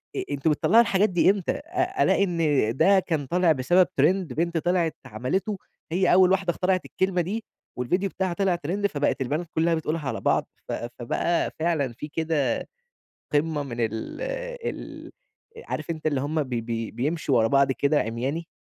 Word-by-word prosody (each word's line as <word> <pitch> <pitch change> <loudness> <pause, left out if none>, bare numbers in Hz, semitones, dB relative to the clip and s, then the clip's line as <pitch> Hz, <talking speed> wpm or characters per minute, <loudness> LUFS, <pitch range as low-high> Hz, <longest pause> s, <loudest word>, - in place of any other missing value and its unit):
أ - - -1
أنتم 145 +2 +1
بتطلَّعوا 215 +9 +5
الحاجات 205 -1 +2
دي 175 0 +3
إمتى؟ 195 -3 +1
أ 360 +5 -1
ألاقي 200 - +3
إن 175 -3 -1 0.4
ده 195 0 +5
كان 160 -6 -2
طالع 175 +3 +2
بسبب 175 +6 +3
ترند 165 0 +2
بنت 170 +3 -1
طلعت 170 0 +1
عملِتُه 185 - -2 0.3
هي 180 +1 +3
أول 185 0 +6
واحدة 190 -2 +2
اخترعت 185 +1 0
الكلمة 190 -2 0
دي، 210 +6 -3 0.3
والفيديو 180 +11 0
بتاعها 185 -1 -2
طلع 190 -1 +1
ترند، 185 +5 -1
فبقت 145 -4 -1
البنات 150 +7 -2
كلّها 165 +1 +2
بتقولها 160 -2 -3
على - - -3
بعض، - - +1 0.2
ف - - -4 0.3
فبقى 165 +8 0
فعلًا 155 -7 0
في 150 - -7
كده 155 -5 -1 0.7
قمة 150 0 +1
من 130 -4 -6
ال 110 - -3 0.5
ال - - -10 0.5
عارف - - -5
أنت 160 -2 -4
اللي 140 -3 0
هُم 155 +2 0
ب 130 - -12
بي 115 -2 -3
بيمشوا 145 0 0
ورا 110 -1 +4
بعض 140 +2 +3
كده 145 +3 +2
عمياني. 130 +9 -3
165 Hz, 170 wpm, -25 LUFS, 140-185 Hz, 0.7 s, أول